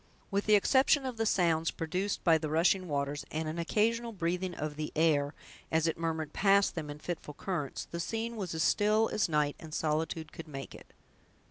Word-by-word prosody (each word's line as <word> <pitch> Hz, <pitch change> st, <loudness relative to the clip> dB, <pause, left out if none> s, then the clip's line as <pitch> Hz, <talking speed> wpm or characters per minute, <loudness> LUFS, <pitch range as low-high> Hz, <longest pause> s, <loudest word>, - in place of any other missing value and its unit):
With 200 Hz, +1 st, 0 dB
the 215 Hz, -, +7 dB
exception 265 Hz, +6 st, +4 dB
of 255 Hz, -3 st, -4 dB
the 225 Hz, 0 st, +1 dB
sounds 165 Hz, -4 st, +2 dB
produced 185 Hz, +5 st, -2 dB
by 165 Hz, -2 st, +5 dB
the 155 Hz, -1 st, -3 dB
rushing 175 Hz, +4 st, +2 dB
waters, 145 Hz, -1 st, -2 dB
and 160 Hz, +1 st, -3 dB
an 160 Hz, +2 st, -3 dB
occasional 230 Hz, +7 st, +1 dB
breathing 180 Hz, -1 st, -2 dB
of 150 Hz, 0 st, -4 dB
the 155 Hz, 0 st, -4 dB
air, 150 Hz, -2 st, +2 dB, 0.4 s
as 160 Hz, 0 st, +2 dB
it 165 Hz, -, +1 dB
murmured 160 Hz, -2 st, -3 dB
past 200 Hz, 0 st, +4 dB
them 155 Hz, -3 st, -5 dB
in 145 Hz, -, -6 dB
fitful 150 Hz, -2 st, -6 dB
currents, 165 Hz, -7 st, -3 dB
the 170 Hz, -, -6 dB
scene 225 Hz, +6 st, -3 dB
was 185 Hz, -6 st, -4 dB
as 160 Hz, -, +1 dB
still 215 Hz, +4 st, +3 dB
as 210 Hz, -, +1 dB
night 150 Hz, -2 st, +1 dB
and 155 Hz, -2 st, -8 dB
solitude 160 Hz, +1 st, -1 dB
could 165 Hz, -, -9 dB
make 135 Hz, -3 st, -7 dB
it. -, -, -14 dB
165 Hz, 200 wpm, -31 LUFS, 155-200 Hz, 0.4 s, the